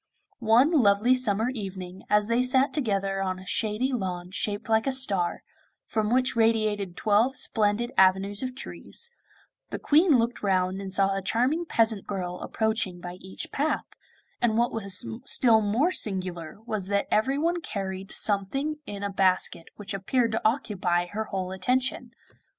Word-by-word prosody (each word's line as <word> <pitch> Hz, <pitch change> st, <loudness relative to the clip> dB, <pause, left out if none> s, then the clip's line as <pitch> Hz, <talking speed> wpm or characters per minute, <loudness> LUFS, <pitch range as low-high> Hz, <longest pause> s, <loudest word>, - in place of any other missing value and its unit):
One 240 Hz, +6 st, +4 dB
lovely 235 Hz, -5 st, +4 dB
summer 235 Hz, -2 st, +1 dB
evening, 190 Hz, -5 st, -7 dB
as 210 Hz, 0 st, +3 dB
they 235 Hz, +2 st, +2 dB
sat 260 Hz, +2 st, +2 dB
together 195 Hz, -8 st, -1 dB
on 185 Hz, -1 st, -2 dB
a 190 Hz, -, -12 dB
shady 220 Hz, +7 st, -1 dB
lawn 180 Hz, -5 st, -4 dB
shaped 205 Hz, +2 st, -3 dB
like 220 Hz, +2 st, +2 dB
a -, -, +2 dB
star, 200 Hz, -10 st, +1 dB, 0.4 s
from 215 Hz, 0 st, -1 dB
which 255 Hz, 0 st, +2 dB
radiated 215 Hz, -5 st, +1 dB
twelve 225 Hz, +5 st, +2 dB
splendid 220 Hz, +2 st, 0 dB
avenues 190 Hz, +2 st, +3 dB
of 255 Hz, -1 st, -4 dB
trees, 470 Hz, -, -4 dB, 0.6 s
the -, -, -4 dB
Queen 310 Hz, -1 st, +4 dB
looked 235 Hz, +1 st, -1 dB
round 190 Hz, -1 st, 0 dB
and 195 Hz, -1 st, -6 dB
saw 195 Hz, 0 st, +2 dB
a 195 Hz, -, -2 dB
charming 255 Hz, -, 0 dB
peasant 220 Hz, -6 st, +2 dB
girl 180 Hz, -3 st, -4 dB
approaching 220 Hz, -5 st, -2 dB
by 175 Hz, +1 st, -8 dB
each 190 Hz, +1 st, -6 dB
path, 300 Hz, +3 st, -1 dB, 0.6 s
and 225 Hz, -2 st, +2 dB
what 240 Hz, +1 st, +1 dB
was 195 Hz, -4 st, 0 dB, 0.2 s
still 230 Hz, -5 st, +5 dB
more 230 Hz, -, +1 dB
singular 185 Hz, -, -1 dB
was 215 Hz, -5 st, -3 dB
that 200 Hz, 0 st, 0 dB
everyone 290 Hz, +10 st, +1 dB
carried 195 Hz, -5 st, -5 dB
something 270 Hz, +10 st, -1 dB
in 205 Hz, 0 st, -6 dB
a 200 Hz, -, -2 dB
basket 185 Hz, -3 st, +1 dB
which 205 Hz, -1 st, -6 dB
appeared 230 Hz, +5 st, 0 dB
to 220 Hz, -, -1 dB
occupy 200 Hz, -7 st, 0 dB
her 215 Hz, +5 st, -4 dB
whole 190 Hz, -3 st, -4 dB
attention. 250 Hz, +5 st, -1 dB
210 Hz, 155 wpm, -26 LUFS, 190-245 Hz, 0.6 s, still